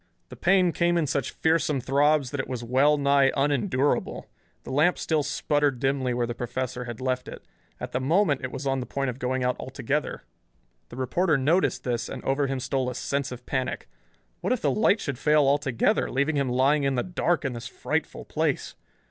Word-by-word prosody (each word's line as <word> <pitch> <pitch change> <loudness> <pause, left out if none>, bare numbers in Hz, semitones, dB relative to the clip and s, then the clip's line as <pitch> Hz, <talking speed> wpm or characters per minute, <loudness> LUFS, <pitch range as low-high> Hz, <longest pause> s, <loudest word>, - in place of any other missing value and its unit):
The - - -9
pain 185 0 +3
came 170 +1 +1
in 165 - +2
such 140 0 -1
fearsome 160 -3 +1
throbs 140 +1 +2
that 145 - -4
it - - -2
was 125 -2 -4
well 135 +5 +3
nigh 140 -1 +4
unendurable. 145 0 0 0.4
The - - -8
lamp 155 +7 +3
still 160 -2 0
sputtered 145 -1 0
dimly 135 -1 0
where 120 0 0
the 120 - -4
professor 125 +1 -4
had 120 -2 -7
left 130 -1 -2
it. - - -10 0.3
At - - -6
the 125 - -1
moment 150 0 +2
it 130 - -3
was 135 0 -6
on 135 -1 0
the 125 - -5
point 135 -2 -2
of 125 - -12
going 130 0 -1
out 125 0 +1
altogether. 135 +3 -3 0.7
The - - -10
reporter 155 +5 +1
noticed 155 +8 +1
this, 120 -2 -2
and - - -7
over 135 +1 +1
him 135 -1 -2
stole 130 0 -1
a 125 - -6
sense 140 +1 -2
of 125 - -9
panic. 130 -1 -3 0.5
What - - -2
if 255 - +1
the - - +3
light 215 0 +3
should 140 -8 -4
fail 150 -1 +4
altogether, 140 -3 +1
leaving 140 +4 0
him 140 -2 0
lying 135 +4 +3
in 135 -1 0
the 125 - 0
dark 175 -3 0
in 135 - -1
this 115 -1 -6
frightful - - -3
place! - - -1
135 Hz, 205 wpm, -26 LUFS, 130-150 Hz, 0.7 s, nigh